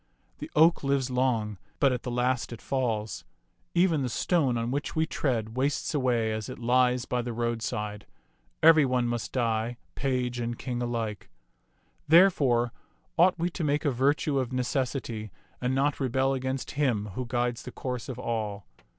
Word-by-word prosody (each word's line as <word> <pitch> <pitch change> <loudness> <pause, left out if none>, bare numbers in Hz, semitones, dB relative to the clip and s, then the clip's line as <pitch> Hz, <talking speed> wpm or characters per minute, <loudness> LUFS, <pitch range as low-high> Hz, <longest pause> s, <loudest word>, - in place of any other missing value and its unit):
The - - -6
oak 160 +1 +5
lives 135 -2 +1
long, 115 -6 0 0.2
but 140 -2 +4
at 125 - -3
the - - -5
last 125 0 0
it 120 - -7
falls. 115 -5 -2 0.5
Even 170 -4 +3
the 130 - -1
stone 135 -1 +1
on 115 +1 -2
which 145 +4 -3
we 160 0 +2
tread 115 -8 -2
wastes 140 +5 0
away 120 -6 +1
as 110 -1 -4
it - - -7
lies 125 +1 +2
by 125 -1 -1
the 120 0 -4
roadside. 110 -3 -3 0.6
Every 160 -2 +8
one 125 -2 +1
must 120 -1 -2
die, 115 -1 0 0.2
page 125 -3 -1
and 120 0 -3
king 125 -2 -4
alike. 115 -4 -3 0.8
Therefore 140 -9 +5 0.4
ought 180 +2 +4
we 175 +1 -1
to 170 - -4
make 150 0 0
a 145 - +3
virtue 140 +2 +1
of 130 -1 -2
necessity 125 -3 -2 0.3
and 125 +1 0
not 140 +2 +1
rebel 130 0 +1
against 130 0 -3
Him 120 -9 0
who 125 +4 -4
guides 120 0 -1
the 125 - -8
course 125 -2 -5
of 130 - -5
all. 110 -5 -3
125 Hz, 165 wpm, -28 LUFS, 115-135 Hz, 0.8 s, Every